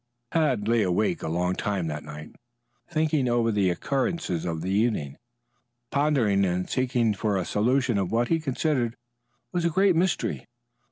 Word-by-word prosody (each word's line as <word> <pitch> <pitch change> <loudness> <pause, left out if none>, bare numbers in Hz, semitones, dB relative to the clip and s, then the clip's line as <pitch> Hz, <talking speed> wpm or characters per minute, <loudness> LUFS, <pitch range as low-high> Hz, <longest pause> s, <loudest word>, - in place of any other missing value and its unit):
Tad 135 -10 +1
lay 115 0 +3
awake 90 -1 +1
a - - -4
long 90 +3 0
time 100 -2 -2
that 75 -1 -4
night 75 0 -9 0.6
thinking 155 -5 +1
over 120 -1 +2
the 100 -3 +2
occurrences 130 - -1
of 80 -2 -3
the 95 - -2
evening, 100 - 0 0.8
pondering 135 -9 +2
and 90 -1 0
seeking 125 -3 +1
for 105 0 -1
a 95 - -1
solution 120 +1 +1
of 95 -2 -2
what 120 +2 +1
he 165 - +2
considered 135 -4 -1 0.6
was 175 - -1
a 170 - +3
great 190 +2 +3
mystery. 175 0 0
115 Hz, 160 wpm, -26 LUFS, 95-140 Hz, 0.8 s, lay